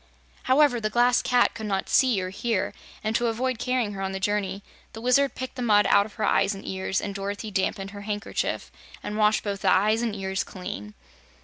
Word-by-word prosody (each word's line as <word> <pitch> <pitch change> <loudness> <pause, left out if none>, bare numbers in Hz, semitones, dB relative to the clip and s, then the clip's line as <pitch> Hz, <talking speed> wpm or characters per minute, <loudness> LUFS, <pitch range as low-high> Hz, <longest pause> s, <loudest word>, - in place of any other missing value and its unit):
However, 260 -3 +4
the 215 - 0
Glass 240 +2 +3
Cat 245 -1 +3
could 220 -2 -6
not 195 -2 -1
see 255 -6 +3
or 185 - -4
hear, 210 0 -1 0.3
and 215 +1 -1
to 240 - +2
avoid 245 +1 -1
carrying 250 -5 0
her 195 - -6
on 190 0 -2
the 190 - -3
journey 200 0 -1 0.3
the 225 - -8
Wizard 250 +4 +2
picked 260 0 -5
the 255 - -6
mud 210 -4 +4
out 200 +1 +5
of 215 - -17
her 220 - -3
eyes 200 - +2
and 195 - -10
ears 190 0 -1
and 200 - -4
Dorothy 200 +2 -4
dampened 195 0 -1
her 205 0 -8
handkerchief 205 +1 -3 0.3
and 210 - -4
washed 215 0 +3
both 200 -2 -3
the 190 - +3
eyes 215 +4 +3
and 230 -3 -1
ears 190 -2 -2
clean. 105 - -7
210 Hz, 215 wpm, -26 LUFS, 195-235 Hz, 0.3 s, out